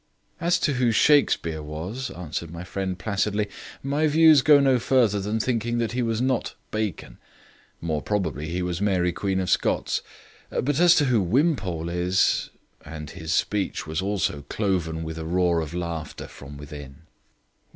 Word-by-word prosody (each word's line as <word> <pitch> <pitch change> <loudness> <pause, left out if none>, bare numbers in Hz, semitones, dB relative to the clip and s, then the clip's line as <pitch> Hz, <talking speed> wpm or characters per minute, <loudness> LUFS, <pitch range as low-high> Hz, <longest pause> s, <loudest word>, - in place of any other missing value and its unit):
"As 170 +1 +2
to 145 - +2
who 125 -2 +2
Shakespeare 110 - +3
was," 85 - -5
answered 85 -1 -5
my 85 +1 -7
friend 95 0 -3
placidly, 105 +1 -1 0.4
"my 145 +3 +1
views 155 -1 +6
go 145 +2 +6
no 135 -2 +3
further 120 -4 +2
than 105 +3 -2
thinking 120 0 -1
that 115 -1 0
he 125 +1 -1
was 115 -2 0
not 130 0 0 0.2
Bacon. 110 -4 -4 0.6
More 80 -2 -1
probably 80 -8 -2
he 90 +2 -2
was 90 0 -3
Mary 90 -4 +2
Queen 95 -1 -1
of 95 - -2
Scots. - - +1 0.5
But 145 +3 -1
as 175 -1 +7
to 145 - +3
who 120 -5 +3
Wimpole 95 - 0
is 90 +2 +1 0.2
" - - -42
and 75 -1 -8
his 80 0 -6
speech 100 -4 -1
also 80 +4 -2 0.3
was 70 - -11
cloven 85 -6 -1
with 80 0 -6
a 80 - -5
roar 85 -1 +2
of 80 -2 -5
laughter 85 -3 -5
from 70 +1 -11
within. 75 0 -10
95 Hz, 165 wpm, -25 LUFS, 80-120 Hz, 0.6 s, as